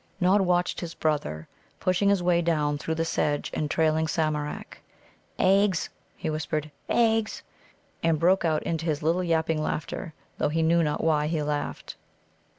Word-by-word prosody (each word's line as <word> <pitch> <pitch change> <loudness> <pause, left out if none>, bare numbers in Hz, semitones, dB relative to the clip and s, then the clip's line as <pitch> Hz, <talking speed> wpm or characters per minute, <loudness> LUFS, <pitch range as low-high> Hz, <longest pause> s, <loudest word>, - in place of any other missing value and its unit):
Nod 190 +2 +4
watched 180 -1 +1
his 170 -2 -6
brother 80 - -1 0.3
pushing 185 +2 +2
his 200 -3 +2
way 175 -1 +3
down 150 -3 0
through 160 +3 -2
the 165 +1 -1
sedge 145 -2 -1
and 150 - -1
trailing 160 0 +2
Samarak. 155 -2 -2 0.6
"Eggs," 195 -1 +3 0.3
he - - -4
whispered 155 -1 -2 0.2
"eggs!" 225 -2 +1 0.6
and 165 -1 +2
broke 180 +3 +3
out 155 -2 +1
into 165 0 -2
his 155 -1 -1
little 170 +4 +2
yapping 160 -2 +1
laughter, 155 +1 -4 0.2
though - - +2
he 160 +2 0
knew 170 +1 +4
not 150 -2 -1
why 150 -2 +2
he 155 -1 -1
laughed. 145 0 -4
160 Hz, 155 wpm, -26 LUFS, 155-175 Hz, 0.6 s, Nod